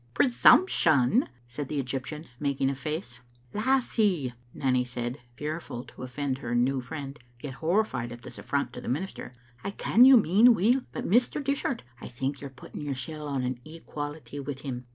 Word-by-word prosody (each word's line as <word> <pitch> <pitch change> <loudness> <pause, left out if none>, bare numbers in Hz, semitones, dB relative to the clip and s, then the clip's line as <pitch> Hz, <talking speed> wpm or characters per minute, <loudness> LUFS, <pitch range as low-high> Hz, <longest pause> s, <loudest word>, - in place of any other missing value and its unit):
" - - -33
Presumption 225 - +5
!" 120 0 -32
said 135 +3 -5
the 145 - -2
Egyptian, 135 +4 -4
making 140 -2 +1
a - - -4
face. 150 -1 -5 0.3
"Lassie," 210 - +1 0.2
Nanny 125 -1 +1
said, 125 +1 -4 0.2
fearful 150 -3 -5
to - - -16
oflEend 130 +1 -3
her 120 -3 -3
new 130 +2 +2
friend, 140 +2 -7 0.2
yet 135 +1 -6
horrified 160 - 0
at 120 0 -9
this - - -8
affront 140 -3 -1
to 125 - -7
the - - -9
minister, 155 +1 -3 0.2
" 120 0 -28
I - - -2
ken 220 +4 +4
you 265 0 +10
mean 220 +4 +6
weel, 235 +7 +3
but - - -5
Mr. 245 +8 +3
Dishart 275 -3 -1 0.2
*11 - - -8
think 135 +3 -3
you're 140 - -6
putting 135 +2 -10
yoursel' 145 +2 -4
on 135 -3 -1
an 125 -1 -2
equality 150 -1 -7
wi* 140 -1 -5
him." 125 -3 -6
140 Hz, 180 wpm, -28 LUFS, 125-170 Hz, 0.3 s, you